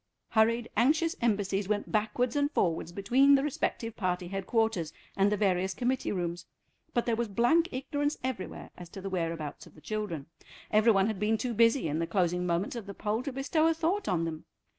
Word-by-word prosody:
Hurried, 230 +1 +2
anxious 310 +8 +3
embassies 205 -3 0
went 210 -1 -1
backwards 230 +4 0
and 285 0 +2
forwards 170 - 0
between 255 +9 +4
the 270 - +2
respective 230 -5 -2
party 180 -3 -2
headquarters 195 -3 0 0.2
and 200 +1 +3
the 210 - +1
various 190 -1 +1
committee 255 +1 -1
rooms, 175 -2 -3 0.5
but 240 - +2
there 235 - +1
was 235 +1 -1
blank 240 - +3
ignorance 285 +3 -2
everywhere 255 -7 -5
as 175 -1 -10
to 195 - -9
the 195 0 -5
whereabouts 165 -5 -3
of - - -18
the - - -14
children. 200 -5 -4 0.5
Every 215 +2 +5
one 195 -2 +3
had 215 -3 -2
been 215 +2 +2
too 245 +1 -2
busy 230 -1 +3
in 155 +1 -1
the 165 - -1
closing 180 -2 0
moments 175 +7 -1
of 225 -4 -6
the 200 - -7
poll 215 +2 -1
to 275 - -4
bestow 275 +5 +1
a 330 - +2
thought 345 +5 0
on 170 -3 +1
them. 160 -1 -5
215 Hz, 200 wpm, -30 LUFS, 185-250 Hz, 0.5 s, Every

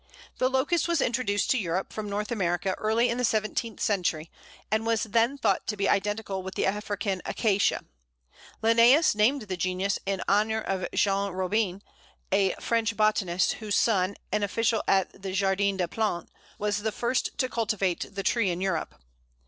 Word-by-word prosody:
The 255 - +3
Locust 280 +7 +1
was 340 -2 +1
introduced 235 -5 0
to 260 - +3
Europe 185 -1 -2
from 215 -1 -5
North 210 +2 -3
America 185 -3 0
early 225 +3 +2
in 235 +1 -1
the - - 0
seventeenth 220 0 -1
century, 170 -6 -1 0.4
and 220 +1 +1
was 225 -1 +1
then 230 +5 +1
thought 195 -8 0
to 210 - -2
be 195 - +1
identical 205 -1 0
with 190 0 -7
the - - 0
African 200 -1 -2
Acacia. 205 -3 +1 0.8
Linnæus 235 +7 +5
named 235 +5 +2
the 190 -3 -4
genus 185 +2 -1
in 195 -1 -1
honour 215 +2 +2
of 195 -4 -2
Jean 200 -1 +1
Robin, 190 +1 -1 0.5
a 195 -1 +2
French 230 -2 -1
botanist, 200 -4 +2
whose 210 -2 -1
son, 200 -3 +2 0.2
an 210 - +1
official 225 +2 +1
at 190 0 +1
the 190 -1 -4
Jardin 195 0 +1
des 180 -2 0
Plantes, 210 -2 -2 0.3
was 210 0 -1
the 220 +1 -1
first 240 +4 -1
to 255 - +1
cultivate 215 -7 -1
the 195 - -3
tree 230 -3 +2
in 175 0 -2
Europe. 190 -3 -2
205 Hz, 170 wpm, -27 LUFS, 190-225 Hz, 0.8 s, Linnæus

